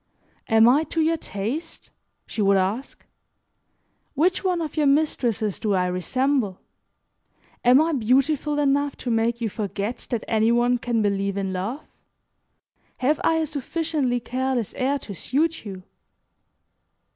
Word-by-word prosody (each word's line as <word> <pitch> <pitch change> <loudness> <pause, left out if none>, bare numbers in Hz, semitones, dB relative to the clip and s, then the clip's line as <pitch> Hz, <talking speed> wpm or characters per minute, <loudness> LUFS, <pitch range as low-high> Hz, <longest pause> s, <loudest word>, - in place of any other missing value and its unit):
"Am 225 0 +5
I 275 +6 +5
to 325 - -3
your 325 +1 +2
taste?" 245 - -5 0.3
she 220 - -4
would 200 -1 +4
ask. 200 +8 -2 1.1
"Which 360 +8 +2
one 365 -2 +1
of 315 -3 -4
your 300 -2 +2
mistresses 245 - +1
do 210 -3 0
I 180 -1 +2
resemble? 210 +4 0 1.0
Am 250 +2 +6
I 320 +2 +2
beautiful 275 +4 +1
enough 285 0 +1
to 245 - -4
make 230 +1 0
you 230 - 0
forget 205 +2 -4
that 235 -3 -2
any 220 +1 +2
one 240 +1 +2
can 230 -2 0
believe 200 -1 0
in 195 -1 -2
love? 210 +11 -4 1.1
Have 285 +4 +1
I 325 - +3
a 320 0 +1
sufficiently 295 -3 -1
careless 255 -2 -2
air 270 +2 0
to 220 -6 -8
suit 305 - -1
you?" 190 -2 -8
245 Hz, 140 wpm, -24 LUFS, 215-290 Hz, 1.1 s, Am